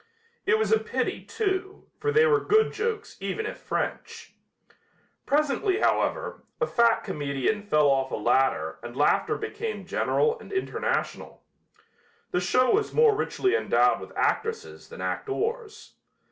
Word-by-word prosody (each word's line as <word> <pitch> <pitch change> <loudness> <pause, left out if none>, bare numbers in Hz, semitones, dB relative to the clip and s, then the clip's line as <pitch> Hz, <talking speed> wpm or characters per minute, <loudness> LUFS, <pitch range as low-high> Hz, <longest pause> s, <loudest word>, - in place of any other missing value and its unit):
It 440 - +4
was 440 - 0
a 445 - +5
pity, - - -3
too, 390 -2 -3
for 440 - 0
they 450 +1 +5
were 450 -2 +4
good 440 +1 +3
jokes 445 0 -3
even 440 - -3
if - - -6
French. 460 0 -4 0.9
Presently, 305 +7 +1
however, - - 0 0.2
a 475 - +2
fat 235 - +2
comedian 145 - -2
fell 150 -8 +2
off 135 -1 +2
a - - -3
ladder 110 -8 +1
and 120 +2 -9
laughter 145 - +2
became 450 -1 -5
general 460 +1 +1
and - - -13
international. 385 -1 -3 0.9
The 180 - 0
show 250 +8 +3
was 425 +1 0
more 460 -2 +5
richly 385 -2 0
endowed - - +3
with - - -9
actresses 455 0 -2
than - - -9
actors. 440 +1 -3
405 Hz, 140 wpm, -26 LUFS, -, 0.9 s, a